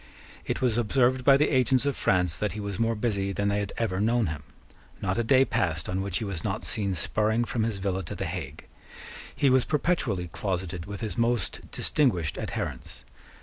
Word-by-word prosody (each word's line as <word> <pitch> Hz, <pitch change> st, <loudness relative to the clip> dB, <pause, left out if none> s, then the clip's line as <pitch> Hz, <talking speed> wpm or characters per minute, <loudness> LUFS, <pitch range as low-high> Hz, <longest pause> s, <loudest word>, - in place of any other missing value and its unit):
It -, -, -2 dB
was 120 Hz, -2 st, +2 dB
observed 125 Hz, +2 st, +2 dB
by 135 Hz, +1 st, +7 dB
the 150 Hz, -, +2 dB
agents 130 Hz, 0 st, +3 dB
of 140 Hz, -, 0 dB
France 90 Hz, -3 st, +1 dB
that 105 Hz, -, -1 dB
he 105 Hz, -, -5 dB
was 100 Hz, -2 st, -4 dB
more 115 Hz, 0 st, +1 dB
busy 100 Hz, -3 st, -1 dB
than 100 Hz, +2 st, 0 dB
they 100 Hz, 0 st, +1 dB
had 100 Hz, -1 st, -3 dB
ever 100 Hz, -5 st, 0 dB
known 115 Hz, +1 st, +2 dB
him. 80 Hz, -3 st, -4 dB, 0.6 s
Not 95 Hz, +3 st, -1 dB
a -, -, +2 dB
day 130 Hz, +3 st, +5 dB
passed 80 Hz, -8 st, -1 dB
on 95 Hz, +1 st, -1 dB
which 95 Hz, -2 st, -2 dB
he -, -, -3 dB
was 95 Hz, -5 st, -4 dB
not -, -, -2 dB
seen 100 Hz, -3 st, 0 dB
spurring 110 Hz, +6 st, +1 dB
from 115 Hz, -, -2 dB
his 110 Hz, -2 st, 0 dB
villa 95 Hz, -1 st, -1 dB
to -, -, -6 dB
the -, -, -3 dB
Hague. -, -, -6 dB, 0.7 s
He 140 Hz, -, +3 dB
was 130 Hz, -1 st, +5 dB
perpetually 130 Hz, -, 0 dB
closeted 90 Hz, -1 st, -3 dB
with 100 Hz, -1 st, -6 dB
his 110 Hz, +1 st, -3 dB
most 115 Hz, -3 st, -1 dB
distinguished 90 Hz, -, +1 dB
adherents. -, -, -5 dB
105 Hz, 200 wpm, -27 LUFS, 95-120 Hz, 0.7 s, by